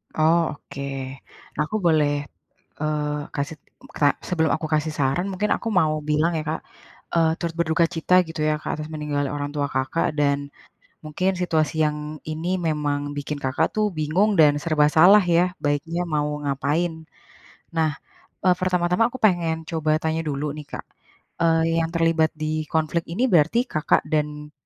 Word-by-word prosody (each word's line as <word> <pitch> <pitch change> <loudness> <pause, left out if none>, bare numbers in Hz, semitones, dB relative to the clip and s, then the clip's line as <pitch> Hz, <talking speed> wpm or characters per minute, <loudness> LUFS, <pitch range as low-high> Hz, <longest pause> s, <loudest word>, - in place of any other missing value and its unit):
Oh, 160 0 +3
oke. 140 -1 -10 0.8
Nah - - +1
aku 215 - -2
boleh, 155 -3 +4 0.7
eee, 150 -1 -1
kasih 145 +2 -3 0.2
m - - -13
ta 145 - +5 0.2
sebelum 160 -3 +1
aku 160 - -5
kasih 155 +1 +1
saran 145 +7 +1
mungkin 205 +3 -1
aku 230 - -6
mau 155 -2 +2 0.2
bilang 155 +3 +2
ya, 155 - -2
Kak, 160 - -2 0.5
eee, 165 -1 +3
turut 170 -1 -3
berduka 165 +1 +2
cita 165 +3 +2
gitu 160 0 -7
ya, 155 - +2
Kak, - - -3
atas 155 - -5
meninggalnya 145 -2 -2
orang 145 0 -3
tua 145 -1 0
Kakak, 130 +5 0
dan 140 -1 +3 0.7
mungkin 185 +5 0
situasi 160 -4 +1
yang 150 0 -3
ini 160 +3 -3
memang 150 -3 -1 0.2
bikin 145 +1 -4
Kakak 135 +4 0
tuh 215 - +3
bingung 185 +8 +2
dan 150 -1 +7
serba 155 -3 +3
salah 190 +6 +7
ya, 170 0 +3 0.2
baiknya 145 +4 0
mau 150 -3 -1 0.2
ngapain. 145 +5 0 0.8
Nah, 160 -1 +3 0.5
eee, 185 -1 +4
pertama-tama 180 +2 +2
aku 260 - -12
pengen 175 -5 +2
coba 160 -2 0
tanya 160 0 0
dulu 145 0 -2
nih, 150 - -8
Kak, - - -6 0.6
eee, 165 0 +3
yang 165 - 0
terlibat 165 -1 +2
di 155 0 -3
konflik 160 +1 0
ini 215 +9 -1
berarti 170 +7 +4
Kakak 155 0 +2
dan 150 -1 -2
155 Hz, 165 wpm, -23 LUFS, 150-170 Hz, 0.8 s, dan